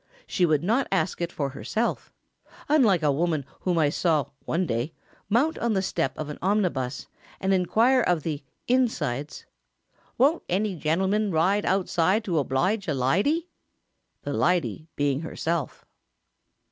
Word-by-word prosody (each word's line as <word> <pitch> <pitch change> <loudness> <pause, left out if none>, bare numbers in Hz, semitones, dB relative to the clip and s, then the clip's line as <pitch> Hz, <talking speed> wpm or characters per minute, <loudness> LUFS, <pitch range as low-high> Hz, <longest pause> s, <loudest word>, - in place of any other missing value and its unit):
She 180 -3 +1
would 155 -1 +2
not 230 +9 +1
ask 190 -2 0
it 170 0 -2
for 140 -2 -2
herself; 220 - -2 0.6
unlike 225 - +4
a 150 - +4
woman 155 -1 0
whom 180 -2 0
I 155 -3 +3
saw, 155 -5 +1
one 180 +3 0
day, 120 +3 -2 0.4
mount 275 +10 +2
on 235 -1 0
the 190 -1 +1
step 135 -7 -1
of 155 - -4
an 150 - -7
omnibus 175 -10 0 0.3
and 190 0 +1
inquire 225 +8 +3
of 175 -8 +1
the 150 -3 -3 0.2
"insides," 150 - 0 0.7
"Won't 290 +7 +3
any 195 +2 0
genelman 190 +7 0
ride 185 +6 +2
outside 190 +2 +2
to 175 -6 0
oblige 180 +10 0
a 150 - 0
lydy?" 200 - +1 0.8
the - - -3
"lydy" 175 -2 0
being 140 -1 +1
herself. 160 -1 -3
175 Hz, 145 wpm, -26 LUFS, 150-210 Hz, 0.8 s, unlike